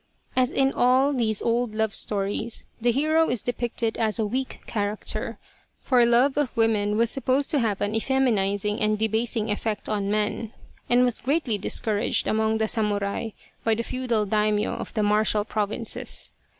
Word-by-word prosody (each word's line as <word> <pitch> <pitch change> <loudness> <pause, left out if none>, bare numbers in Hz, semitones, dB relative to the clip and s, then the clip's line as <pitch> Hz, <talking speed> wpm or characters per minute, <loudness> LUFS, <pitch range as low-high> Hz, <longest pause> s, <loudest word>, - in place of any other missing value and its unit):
As 255 -1 +2
in 270 0 +2
all 260 +3 +3
these 220 -5 0
old 235 -1 0
love 220 -1 0
stories 205 +3 -2 0.2
the 240 - +2
hero 310 +5 +2
is 240 -4 -1
depicted 240 -2 -2
as 220 -1 +1
a 220 - 0
weak 255 +5 -3
character, 205 -1 -3 0.4
for 250 -3 +3
love 250 +4 +3
of 275 -4 -1
women 210 -2 +2
was 230 0 +2
supposed 270 +2 0
to 295 - +2
have 215 -5 -1
an 205 - 0
effeminiz 220 -5 +1
ing 210 0 -1
and 215 0 +2
debasing 220 0 0
effect 210 0 -3
on 200 -2 -1
men 210 +1 -1 0.4
and 245 +1 +5
was 245 -2 0
greatly 265 -6 0
discouraged 210 +1 0
135 - - 0
among 220 0 +1
the 220 0 0
samurai 210 -1 -1 0.3
by 225 -1 +2
the 230 - -2
feudal 240 -4 -1
Daimyo 210 0 +1
of - - -6
the 215 - +1
martial 210 0 +2
pro 210 -1 -1
vinces. 220 +2 -3
220 Hz, 175 wpm, -25 LUFS, 210-245 Hz, 0.4 s, and